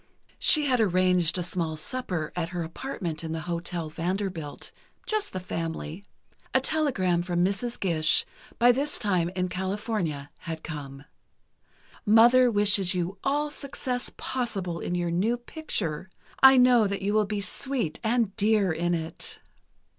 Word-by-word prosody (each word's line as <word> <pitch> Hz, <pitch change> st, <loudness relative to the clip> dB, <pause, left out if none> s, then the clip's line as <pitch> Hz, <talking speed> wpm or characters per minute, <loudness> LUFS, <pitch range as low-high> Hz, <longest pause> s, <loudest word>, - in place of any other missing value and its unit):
She 305 Hz, -3 st, +5 dB
had 255 Hz, -3 st, +2 dB
arranged 185 Hz, -4 st, +3 dB
a 180 Hz, -, -1 dB
small 165 Hz, -2 st, -2 dB
supper 180 Hz, -3 st, -3 dB
at 170 Hz, -2 st, -2 dB
her 175 Hz, -2 st, -3 dB
apartment 165 Hz, -, -4 dB
in 160 Hz, 0 st, -4 dB
the 160 Hz, -, -3 dB
Hotel 170 Hz, 0 st, -3 dB
Vanderbilt, 170 Hz, -1 st, -4 dB, 0.3 s
just 430 Hz, -1 st, -1 dB
the 185 Hz, -, -4 dB
family. 165 Hz, 0 st, -5 dB, 0.5 s
A -, -, +7 dB
telegram 190 Hz, -, +1 dB
from 175 Hz, 0 st, +1 dB
Mrs. 200 Hz, +5 st, -2 dB
Gish, 160 Hz, -5 st, +3 dB, 0.3 s
by 240 Hz, +1 st, +6 dB
this 280 Hz, +4 st, -1 dB
time 185 Hz, -6 st, +1 dB
in 185 Hz, -1 st, 0 dB
California, 185 Hz, -6 st, -3 dB
had 160 Hz, -2 st, -6 dB
come: 140 Hz, -3 st, -7 dB, 1.0 s
"Mother 240 Hz, +3 st, +6 dB
wishes 205 Hz, -3 st, +3 dB
you 180 Hz, +2 st, -3 dB
all 295 Hz, +2 st, 0 dB
success 260 Hz, -3 st, -4 dB
possible 200 Hz, -9 st, -3 dB
in 175 Hz, -, -3 dB
your 175 Hz, -1 st, -1 dB
new 210 Hz, +8 st, +1 dB
picture. 200 Hz, -, -3 dB, 0.3 s
I 265 Hz, 0 st, +9 dB
know 250 Hz, -4 st, +6 dB
that 200 Hz, 0 st, -4 dB
you 205 Hz, +1 st, 0 dB
will 215 Hz, -1 st, +2 dB
be 210 Hz, 0 st, -2 dB
sweet 205 Hz, -, -3 dB
and 225 Hz, -3 st, +1 dB
dear 210 Hz, -3 st, +3 dB
in 175 Hz, +2 st, 0 dB
it." 160 Hz, -1 st, -5 dB
190 Hz, 145 wpm, -27 LUFS, 170-235 Hz, 1.0 s, I